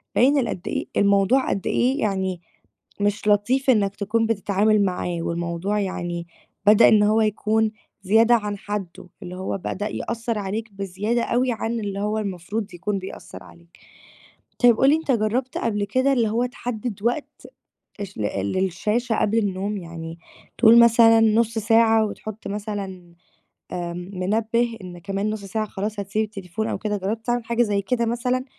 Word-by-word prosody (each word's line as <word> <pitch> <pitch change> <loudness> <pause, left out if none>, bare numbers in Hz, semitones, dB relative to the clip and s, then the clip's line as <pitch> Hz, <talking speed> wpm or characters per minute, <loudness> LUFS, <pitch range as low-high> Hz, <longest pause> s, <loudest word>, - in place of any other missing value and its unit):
باين 275 +4 +4
ال 235 - 0
قدّ 185 - -5
إيه - - -2
الموضوع 200 +6 +3
قدّ 195 - -2
إيه 260 +4 +1
يعني 190 -4 -1 0.6
مش 205 +1 0
لطيف 225 +7 +2
إنّك 205 -5 +3
تكون 220 +3 0
بتتعامل 210 0 +2
معاه 180 -1 -2
والموضوع 170 +5 -2
يعني 175 -3 -3 0.4
بدأ 215 +2 +8
إن 210 -1 +5
هو 215 +2 +3
يكون 215 +1 +1 0.3
زيادة 225 +5 +5
عن 210 -2 -2
حدُّه، 195 -3 -6
اللي 180 +1 -7
هو 190 +1 -3
بدأ 205 +2 -4
يأثّر 230 0 -3
عليك 210 +2 -4
بزيادة 200 +5 -2
أوي 250 +1 +1
عن 230 0 -2
اللي 200 -2 -4
هو 210 +1 -1
المفروض 200 +1 -4
يكون 195 +3 -2
بيأثّر 190 +1 -9
عليك. 170 0 -19 0.8
طيب 240 -2 +6
قُل 270 - +5
لي 300 - +5
أنت 320 -3 -3
جرّبت 240 +3 -1
قبل 210 -3 -1
كده 260 +7 +1
اللي 235 -4 +2
هو 235 +3 +1
تحدِّد 240 -4 -5
وقت 245 +6 -3 0.6
الش 195 - -7
ل - - -4 0.3
للشاشة 210 +6 0
قبل 215 +2 +1
النوم 200 0 -2
يعني 165 -2 -8 0.4
تقول 230 0 +7
مثلًا 230 -1 +6
نُصّ 225 +1 +2
ساعة 225 0 +4
وتحُطّ 215 0 -7
مثلًا 195 -4 -6 0.6
آآ، 175 -1 -4 0.2
منبِّه 225 +5 0
إن 180 -1 -9
كمان 195 +3 -2
نُصّ 215 -2 -5
ساعة 215 +2 -2
خلاص 205 +1 -4
هتسيب 200 +3 -1
التليفون 205 0 -5
أو - - -2
كده 210 -1 -2
جرّبت 215 +4 -3
تعمل 240 -1 0
حاجة 235 +1 +2
زي 205 -3 0
كده 235 +3 0
مثلًا 250 +2 -1
210 Hz, 160 wpm, -23 LUFS, 195-230 Hz, 0.8 s, بدأ